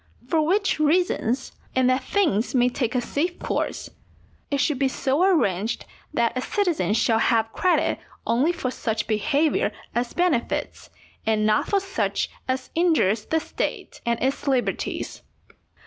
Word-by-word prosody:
For 315 +3 +2
which 380 +3 +1
reasons, 300 -6 +1 0.2
and 260 -1 +3
that 255 +1 +1
things 255 - +1
may 250 0 +4
take 245 -1 -2
a 250 - +2
safe 310 +9 -2
course, - - -3 0.6
it 280 - 0
should 280 -1 +1
be 275 - +3
so 265 +3 0
arranged 225 - +1 0.3
that 235 -5 +1
a 255 - -1
citizen 345 - 0
shall 225 0 +3
have 225 -1 +2
credit 365 - +2 0.3
only 255 +9 +2
for 335 -8 -3
such 220 -4 -2
behaviour 275 +9 +1 0.2
as 240 0 -1
benefits, 345 -9 -1 0.3
and 215 -1 +1
not 215 0 +2
for 400 - +2
such 390 0 -2 0.2
as 260 0 -2
injures 310 - +2
the 320 - +1
State - - -4
and 235 -1 0
its 270 +2 -1
liberties. 260 -3 -1
260 Hz, 150 wpm, -24 LUFS, 230-320 Hz, 0.6 s, may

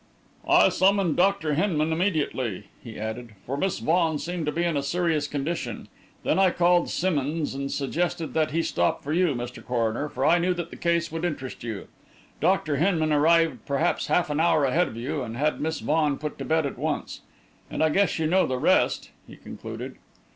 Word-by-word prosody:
"I - - +6
summoned 190 -3 +2
Dr. 180 -4 +2
Hinman 160 -2 +1
immediately," 150 - -1 0.2
he 115 -3 -9
added, 110 +2 -5
"for 135 - -3
Miss 190 +6 -1
Vaughan 165 -1 +1
seemed 170 0 -4
to - - +1
be 170 +3 -1
in 170 -2 0
a 140 - +1
serious 160 0 0
condition; 140 -5 -4 0.3
then - - +1
I 190 -1 +5
called 175 0 +2
Simmonds, 155 -4 -1
and 140 0 -4
suggested 165 +3 -2
that 155 -1 +1
he 165 +2 0
stop 85 - 0
for 145 - -2
you, 170 -4 +2
Mr. 120 +1 -6
Coroner, 120 +3 -1
for 130 -1 -2
I 175 +2 +5
knew 180 +1 +1
that 175 -1 -5
the - - -8
case 170 -1 0
would 165 +1 -4
interest 140 -9 -4
you. 110 -4 -5 0.5
Dr. 155 -3 +1
Hinman 160 -2 +2
arrived 165 +2 +3
perhaps 145 +4 0
half 175 -4 +1
an 150 - -1
hour 160 -3 +3
ahead 160 +7 +2
of 110 - -8
you, 140 +5 -3
and 120 -2 -5
had 150 +3 0
Miss 160 +1 -2
Vaughan 150 -2 +1
put 150 0 -6
to - - -4
bed 160 -1 +1
at 140 - -5
once. - - -3 0.5
And - - -1
I 160 - +4
guess 195 +5 +2
you 160 - 0
know 185 +4 +3
the 130 - -1
rest," - - +2 0.2
he - - -12
concluded. - - -8
155 Hz, 200 wpm, -25 LUFS, 140-170 Hz, 0.5 s, I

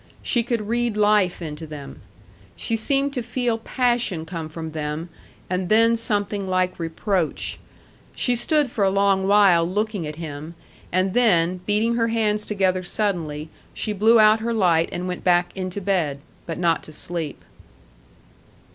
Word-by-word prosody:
She 240 - +2
could 230 -3 -2
read 235 -1 0
life 205 -4 +2
into 155 0 -6
them. 150 -2 -9 0.5
She 230 - -2
seemed 275 +5 0
to 250 - -2
feel 240 -1 -1
passion 240 -8 0
come 165 -2 -6
from 160 0 -6
them, 155 +2 -4 0.4
and 180 0 -2
then 230 +2 +5
something 205 -3 -1
like 185 -1 0
reproach. 170 +1 -2 0.6
She 245 - +1
stood 285 +2 +1
for 210 - 0
a 195 - +4
long 195 -1 +2
while 195 -4 +5
looking 200 0 -2
at 150 - -6
him, 155 0 -7 0.4
and 185 +1 +1
then, 185 -7 +3
beating 220 +3 +2
her 230 -1 +2
hands 215 -2 +1
together 190 -3 +1
suddenly, 170 -6 -2 0.3
she 215 - -2
blew 220 +3 +5
out 215 +1 +6
her 230 +1 -2
light 170 -5 +3
and 175 +1 -4
went 180 -1 -5
back 175 -1 +2
into 185 0 -4
bed, 180 -8 0 0.3
but 165 - -4
not 170 -2 +1
to - - -12
sleep. 160 -1 -5
195 Hz, 155 wpm, -23 LUFS, 170-225 Hz, 0.6 s, out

